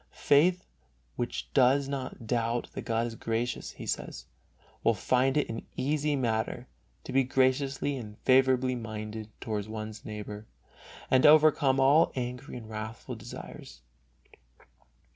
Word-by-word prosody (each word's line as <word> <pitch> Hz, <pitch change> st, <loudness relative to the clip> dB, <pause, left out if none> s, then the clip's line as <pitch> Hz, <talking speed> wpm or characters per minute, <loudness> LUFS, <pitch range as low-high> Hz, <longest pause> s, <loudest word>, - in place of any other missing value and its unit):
Faith 175 Hz, +6 st, +3 dB, 0.5 s
which 120 Hz, -, -4 dB
does 135 Hz, +1 st, +4 dB
not 130 Hz, -4 st, -5 dB
doubt 115 Hz, +1 st, -1 dB
that -, -, -5 dB
God 115 Hz, 0 st, 0 dB
is 120 Hz, -, -5 dB
gracious, 115 Hz, +2 st, -3 dB
he -, -, -9 dB
says, -, -, -4 dB, 0.6 s
will 115 Hz, -, +3 dB
find 130 Hz, +7 st, +2 dB
it 150 Hz, -, +1 dB
an 115 Hz, 0 st, -5 dB
easy 145 Hz, +2 st, 0 dB
matter 120 Hz, -1 st, -1 dB, 0.4 s
to 130 Hz, -, -7 dB
be 135 Hz, 0 st, +4 dB
graciously 135 Hz, +2 st, +1 dB
and 105 Hz, -4 st, -8 dB
favorably 130 Hz, -1 st, +3 dB
minded 110 Hz, -2 st, -6 dB
toward 105 Hz, -3 st, -3 dB
one's 110 Hz, -1 st, -6 dB
neighbor 105 Hz, 0 st, -7 dB, 0.6 s
and 130 Hz, -, +5 dB
to -, -, +8 dB
overcome 150 Hz, -3 st, +5 dB
all 140 Hz, +5 st, +5 dB
angry 125 Hz, +2 st, -5 dB
and 115 Hz, -3 st, -9 dB
wrathful 110 Hz, +3 st, -6 dB
desires. 110 Hz, -, -10 dB
125 Hz, 135 wpm, -29 LUFS, 110-135 Hz, 0.6 s, to